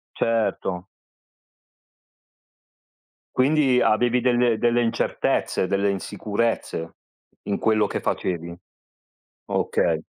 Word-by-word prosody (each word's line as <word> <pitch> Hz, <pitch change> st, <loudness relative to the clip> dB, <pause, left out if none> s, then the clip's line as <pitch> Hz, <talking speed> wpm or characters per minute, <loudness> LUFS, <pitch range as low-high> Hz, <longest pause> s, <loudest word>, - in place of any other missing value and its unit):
Certo. 100 Hz, -5 st, -1 dB, 2.5 s
Quindi 135 Hz, -1 st, +3 dB
avevi 120 Hz, +3 st, +3 dB
delle 120 Hz, -2 st, +2 dB
delle 120 Hz, +1 st, +2 dB
incertezze, 115 Hz, -4 st, 0 dB
delle 100 Hz, +1 st, +1 dB
insicurezze 100 Hz, -3 st, -3 dB, 0.5 s
in 100 Hz, -, -2 dB
quello 110 Hz, -1 st, +2 dB
che -, -, -3 dB
facevi. 85 Hz, -1 st, -3 dB, 0.9 s
Okay. -, -, 0 dB
110 Hz, 75 wpm, -23 LUFS, 100-120 Hz, 2.5 s, Quindi